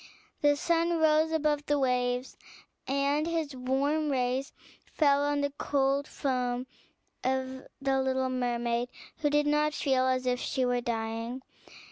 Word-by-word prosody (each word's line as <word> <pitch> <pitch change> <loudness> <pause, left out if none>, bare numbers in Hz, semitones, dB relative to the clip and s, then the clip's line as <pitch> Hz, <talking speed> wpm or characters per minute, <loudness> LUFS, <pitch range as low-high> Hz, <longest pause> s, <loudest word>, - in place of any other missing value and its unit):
The 290 0 +4
sun 335 +2 +1
rose 315 0 +3
above 300 -2 0
the 290 - +2
waves, 250 -1 0 0.5
and 280 +3 +1
his 320 -4 -2
warm 280 +4 0
rays 260 +1 0 0.4
fell 285 -2 +4
on 290 0 +1
the 285 0 -1
cold 275 0 +1
foam 250 -2 -1 0.6
of 260 0 -2
the 270 -1 +1
little 260 0 0
mermaid, 240 -1 -1 0.3
who 295 - +1
did 295 0 +2
not 300 0 +2
feel 260 -2 +2
as 255 0 +1
if 250 0 +1
she 260 0 -1
were 245 0 +1
dying. 230 +2 -3
270 Hz, 140 wpm, -29 LUFS, 250-295 Hz, 0.6 s, The